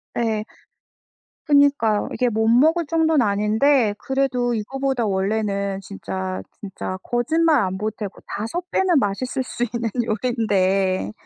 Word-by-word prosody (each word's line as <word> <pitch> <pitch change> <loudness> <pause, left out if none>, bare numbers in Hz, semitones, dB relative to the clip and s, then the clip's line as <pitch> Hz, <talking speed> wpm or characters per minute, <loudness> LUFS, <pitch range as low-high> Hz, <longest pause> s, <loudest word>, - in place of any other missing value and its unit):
네. 220 -2 -1 1.0
그러니까요. 285 -7 +3
이게 250 - 0
못 220 0 0
먹을 315 +9 +4
정도는 320 -2 +2
아닌데 215 +4 +2
그래도 255 -3 0
이거보다 265 +2 -2
원래는 200 0 -1
진짜, 95 - -5 0.2
진짜 190 -1 -5
거짓말 310 +6 +2
안 190 -1 -2
보태고 210 -1 -5
5 335 - -5
배는 370 -4 +2
맛있을 255 +5 -2
수 245 - -4
있는 235 -1 -2 0.2
요리인데 195 - 0
225 Hz, 265 characters per minute, -22 LUFS, 200-270 Hz, 1.0 s, 먹을